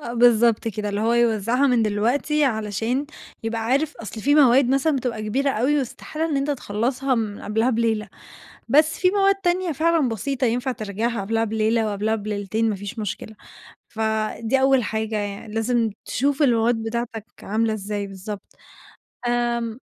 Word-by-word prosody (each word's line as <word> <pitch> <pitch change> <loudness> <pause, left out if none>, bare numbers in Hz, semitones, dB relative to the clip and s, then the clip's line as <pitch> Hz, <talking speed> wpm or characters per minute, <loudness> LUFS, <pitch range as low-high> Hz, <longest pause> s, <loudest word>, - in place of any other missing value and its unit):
آه 235 -5 -6
بالضبط 235 -1 +4
كده، 210 -1 -3
اللي 205 0 -2
هو 225 +2 +2
يوزعها 235 +2 +2
من 245 -4 +3
دلوقتي 245 +8 +1
علشان 225 +3 -1 0.4
يبقى 225 0 -2
عارف 280 +6 0
أصل 220 0 -7
فيه 285 +6 +3
مواد 270 -3 +5
مثلًا 275 +3 +2
بتبقى 240 -4 -3
كبيرة 270 +7 0
أوي 270 +5 +1
واستحالة 305 +4 -4
إن 305 -4 -1
أنت 275 +2 0
تخلَّصها 255 +1 -1
من 215 -3 -3
قبلها 225 +4 0
بليلة، 225 -2 0 0.6
بس 305 +5 +4
فيه 365 - +4
مواد 395 -1 +4
تانية 365 -2 0
فعلًا 320 -1 +2
بسيطة 255 +4 -2
ينفع 245 +3 0
تراجعها 220 +1 -3
قبلها 225 +3 0
بليلة، 220 +1 +1
وقبلها 210 +1 0
بليلتين، 215 +1 -1
ما 205 - -2
فيش 205 +4 -7
مشكلة، 215 +1 -5 0.5
فدي 220 +3 -1
أول 265 -2 +4
حاجة 220 +1 -2
يعني، 205 +1 -5
لازم 225 0 +1
تشوف 280 +4 0
المواد 235 -2 +3
بتاعتك 225 -1 -4 0.2
عاملة 220 +2 0
إزاي 205 -1 -4
بالضبط، 195 +1 -8 0.7
آمم 235 -1 -1
230 Hz, 155 wpm, -23 LUFS, 215-265 Hz, 0.7 s, مواد